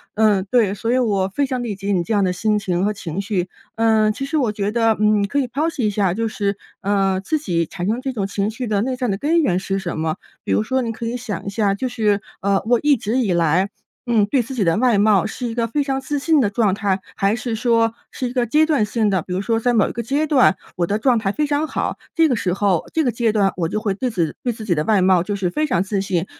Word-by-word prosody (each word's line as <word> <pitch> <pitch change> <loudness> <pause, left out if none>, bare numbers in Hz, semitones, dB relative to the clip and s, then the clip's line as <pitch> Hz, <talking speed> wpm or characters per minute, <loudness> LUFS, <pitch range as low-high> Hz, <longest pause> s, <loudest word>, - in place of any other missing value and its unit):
嗯， 210 -3 +3
对 225 -6 +3
所 225 +3 -2
以 250 - +3
我 200 -6 +1
非 285 - +1
常 255 -2 -2
理 220 -4 -3
解 195 +1 -3
你 175 -2 +1
这 225 - -2
样 205 -2 +3
的 185 - +1
心 210 +2 +1
情 185 -2 -1
和 210 - 0
情 175 -3 -5
绪。 190 -3 -2 0.3
呃， 220 -1 +3
其 270 - -4
实 310 +3 -1
我 245 -7 +1
觉 205 -1 -2
得， 225 -1 +2
嗯， 210 -1 +3
可 285 +6 0
以 260 - 0
剖 290 +7 -1
析 245 - -1
一 - - +2
下， 200 -3 +1
就 225 +3 -1
是， 200 -2 -2 0.2
呃， 195 -1 +1
自 310 +8 -1
己 170 - -1
产 175 +3 -5
生 230 +4 -1
这 265 0 -3
种 200 -5 -2
情 200 +1 -1
绪 245 +1 -5
的 205 -2 +1
内 255 +2 -1
在 250 -1 -2
的 195 -3 -1
根 325 +7 +2
源 185 - +1
是 195 +1 -2
什 175 -4 -4
么？ 160 0 -1 0.3
比 - - -4
如 - - +3
说 260 +4 0
你 230 - -2
可 230 +1 -6
以 240 +2 -2
想 230 -4 -5
一 200 - -3
下 200 0 +1
就 255 +6 -2
是， 210 -4 +1 0.2
呃， 195 0 +1
我 240 -1 +3
一 295 -1 +5
直 230 +1 -2
以 225 -8 +1
来， 170 +3 +2 0.4
嗯， 225 -4 +3
对 250 +2 +1
自 265 - -8
己 235 -6 0
的 165 0 +2
外 240 -2 +3
貌 205 -2 +4
是 240 +3 -4
一 230 - -5
个 230 -1 +1
非 290 +5 0
常 270 -1 -1
自 285 +2 -3
信 315 +1 +3
的 210 -6 +2
状 210 -2 +2
态， 200 -2 0 0.2
还 200 +1 +1
是 240 -1 -3
说 230 -1 +2 0.2
是 255 - -3
一 245 - -8
个 245 -2 +1
阶 300 +7 +3
段 295 -9 +2
性 215 0 0
的， 190 -3 +1
比 180 - -6
如 185 - -1
说 225 +2 0
在 245 +1 +1
某 220 -3 +3
一 - - -4
个 235 - -4
阶 285 +6 0
段， 260 -9 +4 0.2
我 175 - 0
的 205 +5 -1
状 245 -1 +3
态 200 -3 0
非 300 +6 -1
常 290 +2 0
好， - - -2 0.2
这 325 -2 +4
个 255 - +1
时 185 -5 -1
候， 195 -3 +1
这 320 - +2
个 250 - +1
阶 230 -1 +1
段 200 -3 +2
我 165 -3 0
就 215 - -2
会 210 -3 -1
对 250 +5 -2
自 170 -6 0
己 - - -8
对 245 - 0
自 220 -1 -9
己 175 - +1
的 150 - 0
外 205 +1 +2
貌 185 -2 +4
就 205 +2 -3
是 190 -3 -1
非 305 +11 0
常 185 - +1
自 200 0 -2
信， 185 -3 -1
215 Hz, 310 characters per minute, -20 LUFS, 195-245 Hz, 0.4 s, 一